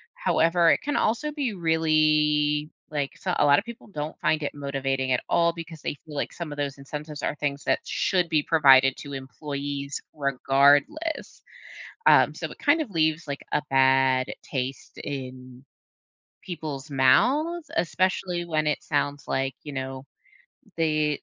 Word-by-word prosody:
However, 165 0 +3
it - - +2
can 290 0 -2
also 235 +8 0
be 280 -7 -2
really, 155 -3 +2 0.2
like 145 -2 -2
so, 185 - -2
a 150 - +3
lotta 145 +3 +5
people 235 0 -11
don't 150 -5 -6
find 155 -1 +1
it 145 - -3
motivating 135 -2 -2
at 125 - +2
all 170 0 +3
because 165 -2 -9
they - - -3
feel 155 -2 -10
like 140 - -3
some 170 -3 -6
of 145 - -7
those 140 -1 -3
incentives 150 +2 -7
are - - -1
things 145 -1 -3
that - - +2
should 180 -3 0
be 155 -2 +2
provided 135 -5 +5
to 140 -1 -8
employees 140 +1 -5
regardless. 140 - +1 0.6
Um, - - +6
so, - - -5
it - - -13
kind 325 - +3
of 285 - -4
leaves, 160 -3 0
like, 140 0 -4
a 150 - +1
bad 130 -1 +3 0.2
taste 130 0 -5
in 130 -1 -7 0.8
people's 155 -5 -6
mouths, 275 - +2
especially 180 +1 0
when 155 -2 -1
it 150 - -1
sounds 145 -1 -1
like, 135 0 -1
you 145 - -7
know, 130 0 -5 0.7
they 155 -2 +1
150 Hz, 155 wpm, -25 LUFS, 140-165 Hz, 0.8 s, Um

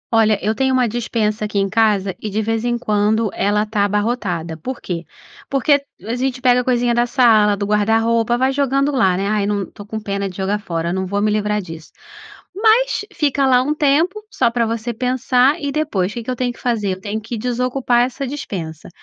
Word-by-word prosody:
Olha, 220 -2 +4
eu 215 +2 +1
tenho 265 +2 +1
uma 250 -2 +3
despensa 215 -2 -1
aqui 210 - -4
em 195 0 +2
casa, 200 -2 +1
e, 215 - -4
de 210 +2 -2
vez 225 +1 -1
em 240 0 0
quando, 215 -1 +1
ela 210 +1 +1
tá 210 -1 0
abarrotada. 200 -6 -1
Por 250 +10 -6
quê? 170 -3 -5 0.4
Porque 280 +1 +2 0.2
a 225 - -3
gente 255 0 -2
pega 250 -1 +3
coisinha 245 -1 +1
da 240 +1 +2
sala, 220 -5 +4
do 200 - -2
guarda-roupa, 225 +3 +2
vai 260 +1 +2
jogando 275 +1 +1
lá, 190 -10 +2
né. 195 - -1
"Ai, 210 -1 0
não, 205 -1 0
estou 205 +2 -11
com 220 0 -4
pena 200 -1 -3
de 185 - -11
jogar 200 +2 -1
fora, 170 -4 -3
eu - - -1
não 190 0 -2
vou 200 +2 -1
me 210 +1 +1
livrar 210 0 0
disso.". 165 -2 -10 0.6
Mas, 445 +3 +3
fica 285 -6 +1
lá 250 -1 +5
um 295 +3 0
tempo, 320 +9 +1
só 235 - +1
pra 235 -1 +1
você 230 +1 -3
pensar, 255 +4 +2
e 285 -1 -3
depois 220 -11 -1
o - - -11
que 235 - -3
que - - -8
eu - - -2
tenho 245 0 -2
que - - -18
fazer? 215 -6 -1
Eu 185 - -9
tenho 210 +2 -3
que 225 +3 -6
desocupar 250 +1 +1
essa 260 +1 -5
despensa. 175 - -6
225 Hz, 220 wpm, -19 LUFS, 205-255 Hz, 0.6 s, lá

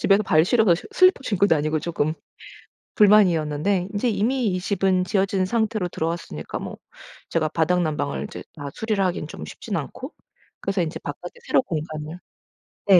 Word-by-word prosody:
집에서 200 +1 +4
발 155 -5 +4
시려서 215 -3 +4 0.2
슬리퍼 370 -3 +5
신고 200 -5 +2
다니고 155 -2 +1
쪼끔 155 -1 -1 0.8
불만이었는데. 185 -3 +3
인제 210 +4 +1
이미 240 +4 0
이 185 -2 0
집은 190 -1 +1
지어진 190 0 +1
상태로 215 -2 0
들어왔으니까 165 - -4
뭐 - - -7 0.5
제가 155 -2 0
바닥난방을 155 - 0
이제 - - -8
다 145 -1 -6
수리를 215 -3 -1
하기는 175 -4 -1
좀 75 - -8
쉽진 - - -6
않고 - - -5 0.5
그래서 195 -2 0
이제 160 -1 -2
바깥에 480 - -8
새로 - - +3
공간을 155 - -5 0.7
네. 190 -3 +8
180 Hz, 360 characters per minute, -23 LUFS, 155-205 Hz, 0.8 s, 네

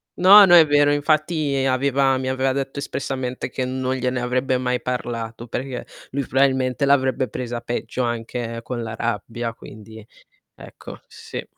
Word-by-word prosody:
No, 200 +3 +8
no 175 -1 +6
è 165 -2 +8
vero, 145 0 +4
infatti 150 -2 0
aveva 135 +1 +2
mi 130 0 -3
aveva 130 0 0
detto 140 +1 -4
espressamente 130 -3 -4
che 130 0 -3
non 130 0 -2
gliene 125 -1 -2
avrebbe 130 +1 0
mai 125 -1 -1
parlato, 120 -2 -5
perché 125 +1 -5 0.3
lui 140 -1 -2
probabilmente 130 0 +1
l'avrebbe 130 -1 +2
presa 120 -1 -5
peggio, 120 +1 -3
anche 115 0 -4
con 120 -1 -5
la 110 -1 -6
rabbia, 115 +1 -3
quindi... 110 0 -13 0.5
Ecco, - - -12
sì. - - -8
130 Hz, 150 wpm, -22 LUFS, 120-140 Hz, 0.5 s, No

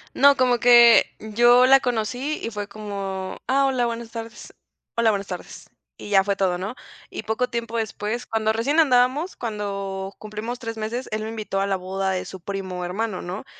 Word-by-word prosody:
No, 280 +1 +6
como 250 -2 +2
que 240 -1 +7 0.2
yo 240 +3 +5
la 270 +1 +7
conocí 245 +4 -2
y - - -2
fue 205 -1 -5
como: 200 -2 -5
"Ah, 275 +1 +3
hola, 255 -2 +1
buenas 235 -1 -4
tardes". 230 -1 -8 0.4
"Hola, 235 -1 +4
buenas 200 -2 -1
tardes". 180 -2 -8 0.3
Y - - -9
ya 195 -1 +5
fue 200 -1 0
todo, 185 -2 0
¿no? 195 +7 -5 0.3
Y - - -6
poco 220 +3 -1
tiempo 235 -1 -3
después, 220 +1 -3
cuando 220 -1 0
recién 275 +9 +2
andábamos, 265 +5 +2
cuando 200 -3 -4
cumplimos 215 +3 -6
3 225 -2 -5
meses, 225 +4 -4
él 215 0 -2
me 220 - -4
invitó 215 -3 -3
a 200 - 0
la 195 -1 0
boda 190 +1 -2
de 185 -1 -2
su 190 - -9
primo 185 -1 -5
hermano, 190 +2 -3
¿no? 185 +7 -6
220 Hz, 190 wpm, -23 LUFS, 195-240 Hz, 0.4 s, que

